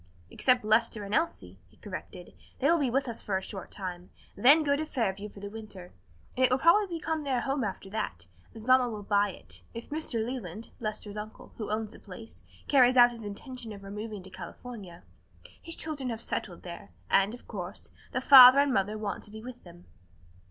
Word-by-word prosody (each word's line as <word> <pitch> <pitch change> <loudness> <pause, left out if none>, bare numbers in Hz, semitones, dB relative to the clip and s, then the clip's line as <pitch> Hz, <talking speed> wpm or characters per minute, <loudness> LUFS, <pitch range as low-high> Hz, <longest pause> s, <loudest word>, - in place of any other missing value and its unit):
"Except 250 -3 +2
Lester 215 0 +2
and 200 +1 -6
Elsie," 95 - -1
he - - -26
corrected; 185 -2 -9 0.2
"they - - -3
will 340 - +3
be 275 -4 +1
with 270 +3 0
us 235 -1 -5
for 195 -3 -1
a - - -4
short 195 -3 -6
time, 180 -2 -7 0.3
then 280 +9 +7
go 285 -1 +2
to 305 - -2
Fairview 210 -8 -2
for 200 - -13
the 200 - -5
winter. 205 -5 -10 0.4
And 255 - +1
it 255 - +4
will 255 - +4
probably 335 +8 +5
become 320 -1 -2
their 265 -3 0
home 270 -1 -1
after 195 -1 -4
that, 85 - -4 0.3
as 220 -1 -9
mamma 255 -1 +5
will 210 -2 -6
buy 205 0 +2
it, 90 - -7
if 230 +4 -8
Mr. 270 -8 -2
Leland 225 -4 -6
Lester's 215 -1 -5
uncle, 215 +1 -9
who 215 - -5
owns 215 0 -2
the - - -11
place 220 +3 -11 0.3
carries 255 -2 +5
out 245 0 +8
his 230 -2 -9
intention 230 +3 -7
of 200 -1 -10
removing 210 0 -6
to 190 - -10
California. 185 -2 -10 0.6
His 330 0 -3
children 285 -5 -3
have 225 -2 -4
settled 185 -5 -4
there, 170 - -9 0.2
and, 195 +4 +3
of 245 - -17
course, 185 -3 -7 0.2
the 255 - -1
father 260 -1 +10
and 280 -1 +4
mother 205 0 0
want 210 -1 -4
to - - -13
be 220 +1 -9
with 245 0 -10
them." 175 0 -15
220 Hz, 205 wpm, -29 LUFS, 195-255 Hz, 0.6 s, father